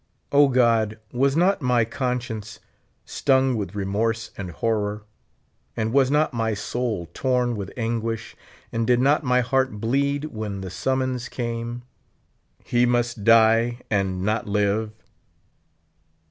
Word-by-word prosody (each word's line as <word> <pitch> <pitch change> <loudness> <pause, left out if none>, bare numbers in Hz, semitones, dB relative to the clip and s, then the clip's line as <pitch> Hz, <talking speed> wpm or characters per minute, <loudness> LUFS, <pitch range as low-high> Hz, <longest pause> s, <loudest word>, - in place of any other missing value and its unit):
(), - - -46
God, 120 -6 +3
was 135 +4 +1
not 180 +1 +3
my 125 -3 +2
con 125 +1 -1
science 110 -4 -7 0.5
stung 130 -2 +2
with 100 -3 -4
remorse 110 +3 -1
and 95 -2 -6
horror, 105 +2 -2 0.7
and 110 +1 -1
was 135 -2 +4
not 150 0 +2
my 110 -2 -1 0.2
Boul 115 -8 -2
torn 125 -2 0
with 100 -3 -5
anguish, 115 -1 -3 0.4
and 115 -1 -1
did 125 -1 +4
not 140 +4 +3
my 125 -1 +3
heart 130 0 +1
bleed 140 +6 0
when 105 -3 -5
the 95 -2 -6
summons 130 +3 -1
came: 120 0 -4 0.8
"He 120 0 +2
must 120 -2 0
die, 115 +2 +4
and 95 -3 0
not 110 +2 -1
live." 105 +1 +1
115 Hz, 135 wpm, -24 LUFS, 110-125 Hz, 0.8 s, was